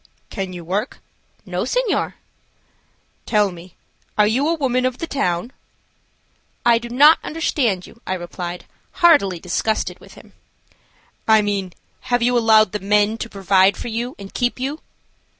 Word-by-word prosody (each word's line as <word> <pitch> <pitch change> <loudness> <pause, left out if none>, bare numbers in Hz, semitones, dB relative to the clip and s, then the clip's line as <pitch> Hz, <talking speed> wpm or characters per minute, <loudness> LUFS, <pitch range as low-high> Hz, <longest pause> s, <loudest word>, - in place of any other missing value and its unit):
"Can 190 -2 -4
you 175 -2 -8
work?" 205 - -2 0.5
"No, - - -3
senor." - - -1 1.1
"Tell 210 -3 +2
me, 175 0 -13 0.4
are 210 - +5
you 250 +8 +1
a 335 - +2
woman 255 -5 0
of 255 -1 -1
the - - -4
town?" 230 - -2 1.1
"I 235 -1 +5
do 235 0 -8
not 290 +6 +6
understand 245 - -1
you," 230 - -17
I 185 - -1
replied, 175 0 -6 0.3
heartily 285 - +4
disgusted 190 +5 -2
with - - -16
him. - - -16 0.9
"I 220 -1 +5
mean 195 -3 -2 0.4
have 245 -1 +2
you 245 +1 +2
allowed 220 -3 +5
the 210 - -3
men 210 +3 +1
to 230 - -5
provide 195 -1 +3
for - - -5
you 235 +3 -4
and 200 -1 -11
keep 245 0 -1
you?" 275 +4 -3
220 Hz, 150 wpm, -20 LUFS, 190-250 Hz, 1.1 s, not